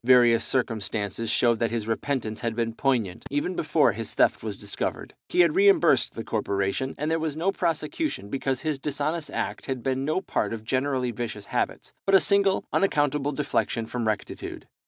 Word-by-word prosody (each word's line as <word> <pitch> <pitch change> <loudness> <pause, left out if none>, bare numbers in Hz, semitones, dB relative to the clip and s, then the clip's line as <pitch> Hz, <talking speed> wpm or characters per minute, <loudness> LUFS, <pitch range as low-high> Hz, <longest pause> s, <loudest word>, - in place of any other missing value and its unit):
Various 120 -2 +6
circumstances 110 -3 -1
showed 120 -1 +3
that 115 - +1
his 115 -1 -3
repentance 115 -1 -2
had 115 -2 -2
been 115 -1 -1
poignant, 115 -8 0
even 145 +6 -1
before - - +3
his - - -4
theft - - +3
was - - -5
discovered. - - -4 0.2
He 360 - +4
had 325 - +3
reimbursed 390 -3 +4
the 115 - -4
corporation, 100 +4 -1
and 150 +2 -1
there 165 - +1
was 155 -2 -2
no 180 +5 +1
prosecution, 170 - -2
because 135 +1 -2
his 155 -3 -2
dishonest 150 +3 -2
act - - -3
had 130 -3 -3
been 135 0 0
no 155 +5 +1
part 190 - -2
of 110 -1 -6
generally 130 0 0
vicious 115 -3 -5
habits, - - -2
but 195 - +5
a - - +9
single 200 0 +3
unaccountable 145 -6 +2
deflection 135 -5 -1
from 115 0 -3
rectitude. 110 -2 -4
130 Hz, 180 wpm, -26 LUFS, 115-155 Hz, 0.2 s, a